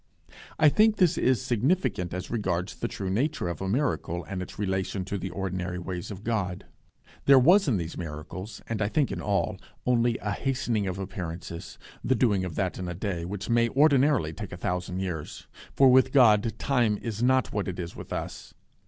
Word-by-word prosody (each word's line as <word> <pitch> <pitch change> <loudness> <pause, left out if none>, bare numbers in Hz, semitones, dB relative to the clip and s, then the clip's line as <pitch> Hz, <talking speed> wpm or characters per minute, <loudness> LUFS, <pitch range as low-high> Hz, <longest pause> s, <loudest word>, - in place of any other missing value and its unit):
I 155 - +6
think 215 +6 +4
this 180 -3 +4
is 130 -3 +2
significant 125 - 0
as 90 +1 -5
regards 95 -5 -1
the - - -3
true 95 -2 -4
nature 120 - 0
of 85 0 -4
a 95 - -2
miracle, 105 - -1
and 90 +4 -5
its 90 - -8
relation 95 -1 -2
to 100 - -4
the - - -4
ordinary 90 -2 -3
ways 90 -1 -5
of 100 0 -8
God. 100 -6 -2 0.6
There 140 -1 +8
was 175 +9 +6
in 120 -7 +2
these 85 -2 -4
miracles, 85 +5 -7
and 110 -2 -3
I 100 - +2
think 140 +6 +1
in - - -4
all, 100 -2 0 0.3
only 120 -1 +2
a 105 - -3
hastening 120 -4 -1
of 95 0 -3
appearances; 85 -4 -6 0.3
the 130 - +2
doing 105 -8 +2
of 90 -3 -5
that 95 -3 -1
in 90 - -4
a 85 - -4
day, 90 -3 -3
which 100 +2 -5
may 115 0 +3
ordinarily 140 - +3
take 105 +2 -7
a 90 - -6
thousand 90 +1 -2
years, 85 -5 -5 0.3
for 135 -2 +6
with 130 +1 +5
God 115 -4 +5
time 120 -6 +1
is 110 -2 -4
not 130 0 +2
what 105 -1 -1
it 95 - -4
is 85 -1 -6
with - - -10
us. - - -6
100 Hz, 195 wpm, -27 LUFS, 90-125 Hz, 0.6 s, There